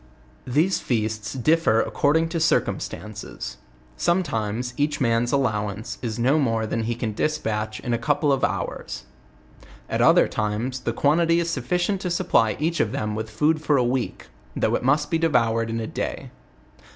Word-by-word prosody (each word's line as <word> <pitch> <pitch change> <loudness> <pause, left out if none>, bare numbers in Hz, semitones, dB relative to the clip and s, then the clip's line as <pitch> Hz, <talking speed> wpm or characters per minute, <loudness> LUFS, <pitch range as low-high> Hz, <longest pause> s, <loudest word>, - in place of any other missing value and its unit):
These 155 +9 +2
feasts 110 -2 -2
differ 135 -2 +3
according 160 +7 +2
to 165 - -2
circumstances; 110 - -2 0.4
sometimes 120 - 0
each 145 +2 0
man's 120 -1 +1
allowance 110 -5 -1
is 115 -2 -3
no 130 +6 +3
more 115 -5 +1
than 110 +1 -2
he 120 +1 -1
can 110 -2 -3
despatch 110 -6 -2
in 120 - -2
a 120 - 0
couple 145 +3 +1
of 135 - -1
hours. 65 - -3 0.8
At - - -1
other - - +6
times 110 +5 -2
the 125 - -2
quantity 165 +6 +3
is 170 0 -1
sufficient 175 - -1
to 180 - -2
supply 170 - +2
each 165 +3 0
of 105 - +1
them 105 -6 -2
with 110 +1 -4
food 150 +8 +1
for 150 -2 +2
a 125 - +3
week, 125 0 -2 0.3
though - - +1
it - - +1
must 145 +4 +1
be 165 - +2
devoured 115 -8 +2
in 115 0 -2
a 115 - -3
day. - - -4
125 Hz, 165 wpm, -24 LUFS, 110-155 Hz, 0.8 s, other